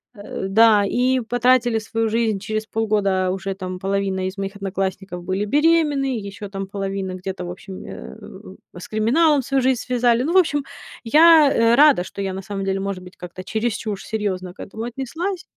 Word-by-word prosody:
Э, 200 -2 -6
да, 210 0 +5
и 255 +4 +1
потратили 245 -1 +2
свою 225 +1 -2
жизнь. 220 -2 0
Через 215 +2 -4
полгода 200 -5 0
уже 190 0 -4
там 185 -1 -6
половина 195 -1 -1
из 190 +1 -7
моих 195 +1 -4
одноклассников 190 -2 -4
были 190 +3 -2
беременны, 290 -1 +2
ещё 200 0 -8
там 195 -1 -5
половина 195 -1 -4
где-то, 185 0 -6
в 175 - -5
общем, 185 +1 -9
э, - - -9 0.6
у, - - -10
с - - -9
криминалом 275 +8 +3
свою 270 +1 0
жизнь 260 -2 +2
связали. 245 -1 +2
Ну, 325 +6 -1
в - - +5
общем, 290 -6 +3 0.4
я, 310 +4 +7
э, 230 +1 +4
рада, 290 -10 +6
что 200 - -8
я 190 -1 -2
на 190 - -5
самом 195 -1 -4
деле, 195 0 -1
может 195 -2 -4
быть, 180 0 -14
как-то 180 +1 -9
чересчур 220 -1 -2
серьёзно 190 -5 -3
к - - -33
этому 220 +3 -7
отнеслась. 325 +10 -4
210 Hz, 185 wpm, -21 LUFS, 195-245 Hz, 0.6 s, я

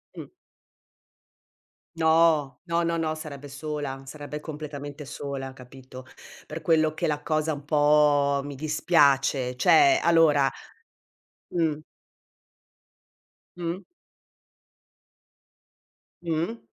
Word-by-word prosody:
Mh. - - -9 1.7
No. 160 -4 +3
No, 170 0 0
no, 170 0 0
no, 155 -1 -1
sarebbe 145 -3 -8
sola, 140 -1 -5
sarebbe 150 +2 -7
completamente 150 -1 -8
sola, 135 -1 -6
capito, 130 0 -13 0.4
per - - -7
quello 155 -1 +2
che - - -2
la 150 -1 -1
cosa 155 0 0
un 145 0 -9
po' 145 -2 +3
mi 145 0 -7
dispiace, 140 -4 +2
cioè 345 - +5
allora 155 -5 +4 1.0
Mh. 160 -4 +1 1.8
Mh. 175 +1 -3 2.4
Mh. 170 +7 -2
150 Hz, 90 wpm, -26 LUFS, 140-160 Hz, 2.4 s, cioè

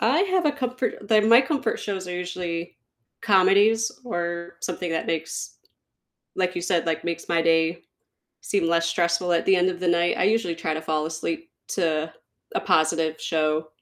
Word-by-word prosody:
I 260 +10 +3
have 375 -2 +1
a 295 - +2
comfort 250 -6 -3
the 215 -1 +5
my 230 +3 +7
comfort 270 -4 -1
shows 190 -3 -4
are 180 - -4
usually 175 -2 -4 0.5
comedies, 205 +2 +4
or 170 -5 -4
something 180 -1 -3
that 160 - -2
makes 165 -1 -4 0.8
like 185 -1 0
you 175 - -2
said, 175 -1 0
like, 165 -2 -1
makes 170 -1 -4
my 170 -1 +3
day 165 +1 +2 0.6
seem 195 -4 0
less 170 0 +2
stressful 170 +1 +1
at 170 - +1
the 190 -1 +5
end 180 +1 +3
of 175 - -7
the 180 - 0
night, 170 0 +2
I - - +2
usually 205 -4 +1
try 165 -1 -2
to 160 - -5
fall 155 -1 -1
asleep 320 - -4 0.2
to 160 -3 -1 0.4
a - - +1
positive 160 0 +1
show. 155 -1 0
175 Hz, 180 wpm, -24 LUFS, 165-205 Hz, 0.8 s, my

